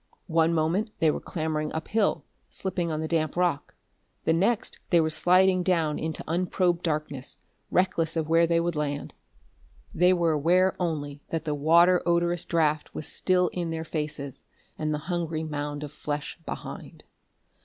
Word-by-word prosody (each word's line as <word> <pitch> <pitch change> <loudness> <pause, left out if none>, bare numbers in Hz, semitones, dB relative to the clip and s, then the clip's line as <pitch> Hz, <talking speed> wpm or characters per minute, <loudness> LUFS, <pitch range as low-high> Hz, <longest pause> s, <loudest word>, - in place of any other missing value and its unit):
One 165 -1 +2
moment 170 +7 +1
they 160 -2 +3
were - - -3
clambering 155 -2 -3
up 160 0 -4
hill, 215 -2 +1 0.2
slipping 180 -3 -2
on 155 0 -2
the 160 - -2
damp 155 -2 0
rock; 175 -5 0 0.5
the 160 - +3
next 200 +7 +1
they 175 - +5
were 160 -1 +1
sliding 185 +3 +4
down 165 -4 +1
into 160 -1 -3
unprobed 175 +1 +1
darkness, 150 -5 -3 0.3
reckless 170 -3 +1
of 160 -2 -1
where 165 +1 +4
they 170 0 +3
would 170 0 -1
land. 145 -1 -3 0.8
They 180 +2 +4
were 170 -2 +2
aware 175 +5 +3
only 145 -5 -3
that 165 -2 -3
the 150 - 0
water 170 +5 +5
odorous 170 0 +1
draft 155 -2 0
was 155 - -4
still 180 -1 +2
in 175 -2 -3
their 160 0 -3
faces, 150 -4 -3 0.3
and 155 0 -2
the 150 - 0
hungry 165 -2 -2
mound 145 -1 -4
of 145 - -6
flesh 150 +1 -5
behind.... - - -7
165 Hz, 165 wpm, -27 LUFS, 155-175 Hz, 0.8 s, they